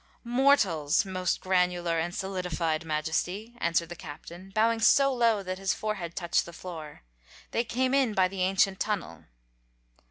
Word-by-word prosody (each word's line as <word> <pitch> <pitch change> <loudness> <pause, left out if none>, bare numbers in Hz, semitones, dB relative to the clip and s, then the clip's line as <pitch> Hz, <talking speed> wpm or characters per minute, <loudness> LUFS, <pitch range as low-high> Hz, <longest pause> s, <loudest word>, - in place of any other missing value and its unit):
"Mortals, 235 - +3
Most 185 -1 -1
Granular 180 -2 +1
and 175 +2 -3
Solidified 180 -4 -2
Majesty," 160 +8 -2
answered 170 -2 0
the 175 - -6
Captain, 170 +4 -10
bowing 225 +3 +2
so 275 +4 +5
low 230 -4 +2
that 185 0 -4
his 195 +1 0
forehead 195 -6 -4
touched 170 -1 0
the 170 - -10
floor. 160 - -9 0.5
"They 230 - +1
came 255 +2 0
in 260 -6 +2
by 185 -1 +4
the 190 0 -5
ancient 190 +1 +2
tunnel." 200 - -3
185 Hz, 150 wpm, -28 LUFS, 170-215 Hz, 0.5 s, so